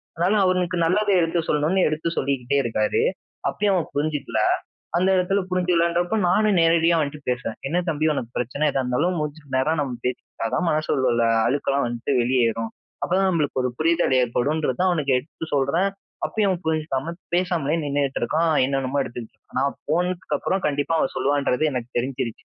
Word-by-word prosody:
அதனால 180 Hz, +6 st, +2 dB
அவனுக்கு 180 Hz, -1 st, +1 dB
நல்லதை 200 Hz, +4 st, +2 dB
எடுத்து 165 Hz, +1 st, 0 dB
சொல்லணும்ன்னு 160 Hz, +6 st, +2 dB
எடுத்து 155 Hz, +2 st, -2 dB
சொல்லிக்கிட்டே 135 Hz, 0 st, 0 dB
இருக்காரு. 110 Hz, -2 st, 0 dB, 0.5 s
அப்பயும் 205 Hz, -1 st, +1 dB
அவன் 165 Hz, -, -2 dB
புரிஞ்சுக்கல. 145 Hz, -7 st, -1 dB, 0.6 s
அந்த 185 Hz, +2 st, +2 dB
இடத்துல 190 Hz, +2 st, +2 dB
புரிஞ்சுக்கலன்றப்போ 175 Hz, +1 st, +1 dB
நானும் 205 Hz, +1 st, +3 dB
நேரடியா 165 Hz, 0 st, +4 dB
அவன்ட்ட 150 Hz, -1 st, -2 dB
பேசுவேன். 125 Hz, -3 st, -2 dB
"என்ன 170 Hz, -, -1 dB
தம்பி 155 Hz, 0 st, +1 dB
உனக்கு 120 Hz, -4 st, -4 dB
பிரச்சனை 130 Hz, +5 st, -1 dB
எதா 135 Hz, -1 st, 0 dB
இருந்தாலும் 145 Hz, +9 st, 0 dB
மூஞ்சிக்கு 145 Hz, -2 st, -5 dB
நேரா 130 Hz, +4 st, +2 dB
நம்ம 135 Hz, -3 st, -2 dB
பேசிக்கிட்டா 125 Hz, -2 st, -3 dB
தான் 175 Hz, -, 0 dB
மனசுல 130 Hz, -7 st, +1 dB, 0.2 s
அழுக்கெல்லாம் 140 Hz, +1 st, 0 dB
வந்துட்டு 120 Hz, +3 st, -3 dB
வெளியேறும். 115 Hz, -2 st, +1 dB, 0.3 s
அப்போதான் 190 Hz, +2 st, +2 dB
நம்மளுக்கு 150 Hz, -5 st, 0 dB
ஒரு 125 Hz, -, +1 dB
புரிதல் 165 Hz, -3 st, +2 dB
ஏற்படும்ன்றது." 130 Hz, +3 st, 0 dB
தான் 185 Hz, -, +3 dB
அவனுக்கு 140 Hz, -6 st, +1 dB
எடுத்து 160 Hz, +4 st, -7 dB
சொல்றேன். 165 Hz, +8 st, +2 dB, 0.4 s
அப்பயும் 210 Hz, -3 st, +1 dB
அவன் 180 Hz, -, -3 dB
புரிஞ்சுக்காம 155 Hz, 0 st, -1 dB, 0.2 s
பேசாமலே 170 Hz, -4 st, 0 dB
நின்னுட்டு 140 Hz, -1 st, -1 dB
இருக்கான். 160 Hz, +5 st, +1 dB, 0.2 s
என்னென்னமோ 135 Hz, 0 st, -1 dB
எடுத்துட்டு 120 Hz, -2 st, -8 dB
இருக்கான். -, -, -11 dB
நான் 140 Hz, 0 st, +1 dB, 0.2 s
போனதுக்கு 175 Hz, -2 st, 0 dB
அப்புறம் 190 Hz, +1 st, -1 dB
கண்டிப்பா 145 Hz, +2 st, -1 dB
அவன் -, -, 0 dB
சொல்லுவான்றது 140 Hz, +1 st, +1 dB
எனக்கு 125 Hz, -1 st, -4 dB
தெரிஞ்சிடுச்சு. 130 Hz, -2 st, -4 dB
150 Hz, 155 wpm, -23 LUFS, 130-175 Hz, 0.6 s, நேரடியா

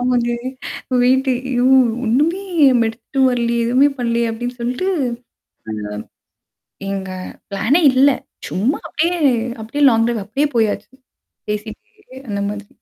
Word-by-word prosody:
ஆமாங்க. 245 Hz, -1 st, +1 dB, 0.7 s
வெயிட் 260 Hz, +2 st, +3 dB
ஐயோ! 250 Hz, 0 st, -1 dB, 0.4 s
ஒண்ணுமே 300 Hz, -, +1 dB, 0.3 s
நம்ம 235 Hz, -3 st, +3 dB
எடுத்துட்டு 240 Hz, +4 st, -5 dB
வரலையே, 235 Hz, -1 st, 0 dB
எதுவுமே 260 Hz, +4 st, +4 dB
பண்ணலையே 235 Hz, -1 st, 0 dB
அப்படின்னு 245 Hz, +2 st, -5 dB
சொல்லிட்டு 250 Hz, +11 st, -1 dB, 2.0 s
எங்க 190 Hz, -1 st, -4 dB, 0.4 s
பிளான்னே 225 Hz, -, +2 dB
இல்லை. 265 Hz, +1 st, +5 dB, 0.3 s
சும்மா 225 Hz, +10 st, 0 dB
அப்படியே 345 Hz, +2 st, 0 dB, 0.4 s
அப்படியே 255 Hz, +7 st, -2 dB
லாங் 225 Hz, -1 st, +3 dB
டிரைவ் 230 Hz, -4 st, -1 dB
அப்படியே 275 Hz, +9 st, 0 dB
போயாச்சு. 220 Hz, -2 st, 0 dB, 0.6 s
பேசிட்டே 220 Hz, -, -7 dB
அந்த 200 Hz, -1 st, -2 dB
மாதிரி. 205 Hz, 0 st, -7 dB
245 Hz, 110 wpm, -19 LUFS, 225-265 Hz, 2.0 s, இல்லை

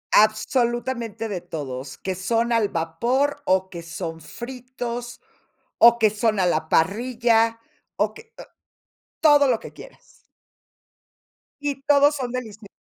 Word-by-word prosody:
Absolutamente 230 Hz, +1 st, +1 dB
de 195 Hz, -5 st, -4 dB
todos, 135 Hz, -6 st, -6 dB
que 190 Hz, -1 st, -4 dB
son 230 Hz, +5 st, 0 dB
al 220 Hz, -3 st, +2 dB
vapor, 235 Hz, -, -1 dB
o 190 Hz, 0 st, +2 dB
que 170 Hz, -2 st, -8 dB
son 165 Hz, 0 st, -6 dB
fritos, 245 Hz, -, -7 dB, 0.6 s
o 235 Hz, 0 st, +7 dB
que 220 Hz, -2 st, +4 dB
son 215 Hz, -1 st, 0 dB
a 180 Hz, -, +3 dB
la 160 Hz, -2 st, 0 dB
parrilla, 230 Hz, +5 st, +2 dB, 0.4 s
o -, -, +1 dB
que 450 Hz, 0 st, -15 dB
o -, -, -7 dB, 0.8 s
todo 295 Hz, -2 st, +6 dB
lo 240 Hz, -, +2 dB
que -, -, -10 dB
quieras. -, -, -13 dB, 1.6 s
Y 285 Hz, -2 st, -3 dB
todos 290 Hz, +1 st, +4 dB
son 250 Hz, -3 st, -4 dB
deliciosos. 220 Hz, -4 st, -6 dB
230 Hz, 130 wpm, -23 LUFS, 190-250 Hz, 1.6 s, o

